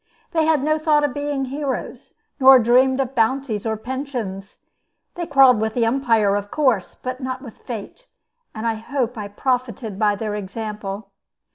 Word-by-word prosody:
They 320 -2 +2
had 310 -4 +2
no 310 +1 +1
thought 305 -1 +3
of 290 -3 0
being 285 -1 -2
heroes, 275 +1 -5 0.2
nor 265 0 +9
dreamed 255 +3 +4
of 265 -1 -1
bounties 230 -2 0
or 220 -1 -1
pensions. 235 -6 -5 0.6
They 345 -1 -5
quarreled 265 -7 +6
with 220 0 -1
the 235 -2 +2
umpire, 225 -5 +2
of 205 0 -3
course, 255 - +1
but 255 +1 -6
not 255 0 -4
with 235 -5 -11
Fate; 245 - -8 0.5
and 220 +1 -5
I 230 - +2
hope 245 +2 -3
I 210 -3 -5
profited 235 -2 -2
by 210 -2 +3
their 210 0 -4
example. 210 0 -6
245 Hz, 165 wpm, -21 LUFS, 215-270 Hz, 0.6 s, nor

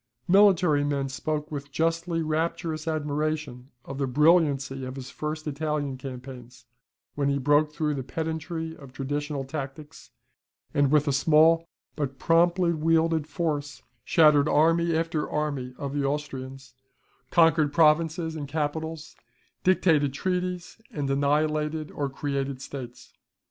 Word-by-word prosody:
Military 180 -6 +5
men 140 -2 -1
spoke 150 +3 -3
with 140 -1 -5
justly 165 +2 0
rapturous 160 0 -2
admiration 150 -4 -2 0.2
of 135 0 -7
the 135 - 0
brilliancy 140 -2 +2
of 130 0 -6
his 135 0 -8
first 155 0 -5
Italian 150 -2 -2
campaigns, 125 -2 -10 0.5
when 140 -1 0
he 140 - +1
broke 145 +2 +3
through 150 -1 -1
the 140 - -3
pedantry 160 +3 -4
of 140 -4 -13
traditional 145 +2 -3
tactics, 145 +2 -8 0.6
and 145 -1 +3
with 150 +1 +3
a 140 - +2
small 165 +4 +4 0.3
but 140 -3 -3
promptly 170 +2 +3
wielded 160 -1 +1
force, 145 -3 -3 0.2
shattered 150 -2 +4
army 165 +2 +3
after 160 -1 -1
army 140 -4 -3
of 140 -1 -5
the 145 -1 -1
Austrians, 135 -2 -4 0.6
conquered 160 -3 +4
provinces 160 +1 +2
and 145 -2 -5
capitals, 160 +2 -4 0.5
dictated 160 -7 +3
treaties, 180 +4 -3
and 145 -2 -3
annihilated 150 +2 0
or 145 -1 -3
created 140 -1 -3
states. 130 -3 -9
150 Hz, 130 wpm, -26 LUFS, 140-160 Hz, 0.6 s, Military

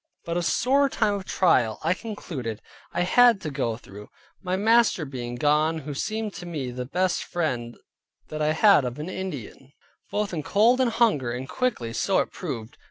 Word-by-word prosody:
But 170 - -3
a 175 - +1
sore 275 +10 +2
time 215 -5 +1
of 200 -2 -4
trial, 120 - +2
I 165 +3 +3
concluded, 160 - -6 0.3
I - - -1
had 235 +4 +5
to 155 - -4
go 120 -5 -2
through, 105 -3 -12 0.3
my 185 -1 -1
master 220 -4 +3
being 120 -3 -5
gone, 150 +4 +2
who 145 +1 -6
seemed 215 +7 -3
to 175 - -8
me 145 -7 -4
the 125 0 -5
best 185 +5 0
friend 125 -9 -3 0.5
that 155 0 -4
I 150 0 +2
had 180 -3 +5
of 125 +1 -4
an 150 +4 -5
Indian, 145 - -7 0.4
both 210 -2 -2
in 160 - -2
cold 230 - +3
and 255 - +3
hunger, 210 - +2
and 125 +2 -5
quickly 210 - -2
so - - +1
it - - 0
proved. 115 +3 -6
160 Hz, 185 wpm, -25 LUFS, 130-205 Hz, 0.5 s, had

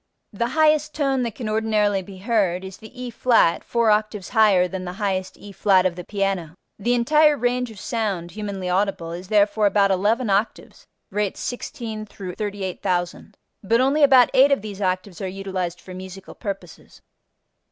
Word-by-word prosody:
The 235 +4 -1
highest 305 +1 +2
tone 275 -3 +1
that 230 -3 -3
can 235 - -5
ordinarily 215 -2 +1
be 190 +1 -11
heard 190 -3 0
is 190 0 -9
the 220 - -12
E[flat] 240 -7 +2
four 235 -2 +2
octaves 210 -2 -1
higher 205 -5 +4
than 185 0 -5
the 180 0 -5
highest 190 -1 -3
E[flat] 195 -2 +2
of 180 -2 +1
the 180 - -7
piano. 195 -5 -2 0.2
The 240 +5 +1
entire 300 +5 +4
range 245 0 0
of 215 -3 -11
sound 195 -6 -3
humanly 200 -3 -5
audible 180 -2 -1
is 175 +2 -7
therefore 210 0 +3
about 200 -1 +3
eleven 215 +6 +1
octaves 200 +3 -2 0.2
(rates 205 0 -2
16 230 -4 -5
38,000), 190 -1 -4 0.3
but 230 +4 +2
only 275 +4 +2
about 265 -4 +6
eight 275 +2 +6
of 275 -7 +1
these 205 -2 -7
octaves 185 0 -2
are 190 - -2
utilized 185 -2 -4
for 185 - -11
musical 190 +1 -9
purposes. 195 -5 -8
205 Hz, 165 wpm, -22 LUFS, 185-230 Hz, 0.3 s, about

